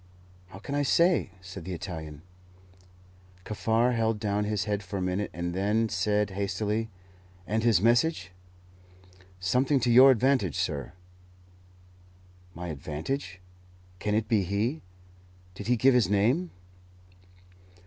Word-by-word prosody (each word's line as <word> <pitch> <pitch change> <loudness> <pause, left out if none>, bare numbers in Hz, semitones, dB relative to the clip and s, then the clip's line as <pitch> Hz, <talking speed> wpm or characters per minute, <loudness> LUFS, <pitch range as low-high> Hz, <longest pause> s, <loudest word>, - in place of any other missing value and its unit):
"How 95 +1 -12
can 120 +8 -7
I 145 - +1
say?" 170 - +3
said 90 -1 -9
the 95 - -5
Italian. 80 -4 -7 1.2
Kaffar 115 +3 +1
held 115 -2 0
down 105 -1 -1
his 105 -1 -1
head 105 -1 -2
for 95 +1 -6
a - - -2
minute, 90 +2 -2
and 85 +1 -4
then 105 +4 +1
said 105 +1 0
hastily, 105 +3 -2 0.6
"And 110 +5 -1
his 110 -5 +3
message?" 120 - +2 1.1
"Something 130 +10 +2
to 120 0 +2
your 130 +3 +8
advantage, 130 +2 +2
sir." 80 -8 -3 1.6
"My 85 +1 -6
advantage? 80 - -5 0.6
Can 105 +1 -1
it 110 0 0
be 110 -3 +2
he? 105 - -1 0.7
Did 100 +2 -8
he 125 - +3
give 130 +3 +4
his 120 -7 +3
name?" 120 - +2
105 Hz, 130 wpm, -28 LUFS, 95-120 Hz, 1.6 s, your